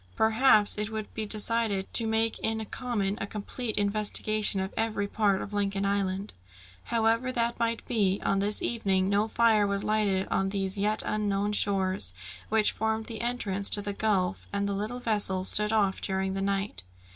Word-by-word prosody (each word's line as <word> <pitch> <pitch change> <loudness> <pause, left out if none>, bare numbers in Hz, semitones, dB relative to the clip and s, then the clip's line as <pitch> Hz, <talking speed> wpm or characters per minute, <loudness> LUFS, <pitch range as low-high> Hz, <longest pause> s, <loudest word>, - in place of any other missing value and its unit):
Perhaps 220 -2 +4
it 210 0 -1
would 220 -1 -6
be 215 -1 -4
decided 215 -2 0
to 230 - +2
make 225 0 0
in 220 0 -2
common 210 -4 -2
a 200 - -3
complete 220 +3 -4
investigation 210 0 +2
of 190 +1 -3
every 215 -2 -1
part 200 -2 +1
of 200 - -9
Lincoln 200 -1 -1
Island. 195 0 -1 0.5
However 230 +2 +1
that 235 -1 -1
might 230 0 -1
be, 200 -5 +1
on 195 - +2
this 205 +1 +1
evening 195 -5 +1
no 205 +2 +2
fire 220 -2 +3
was 200 0 -1
lighted 205 -3 +1
on 195 0 0
these 195 -1 -2
yet 210 +2 +1
unknown 205 -1 0
shores, 190 - 0 0.3
which 215 -1 +3
formed 220 0 -2
the 225 -2 -6
entrance 205 -5 -2
to 205 - +7
the 205 0 -3
gulf, 195 -4 0
and 200 0 -1
the 200 - -1
little 215 +5 -3
vessel 205 -5 0
stood 210 +2 +1
off 205 -3 +1
during 190 0 -1
the 195 - -2
night. 195 - -1
205 Hz, 175 wpm, -28 LUFS, 195-220 Hz, 0.5 s, to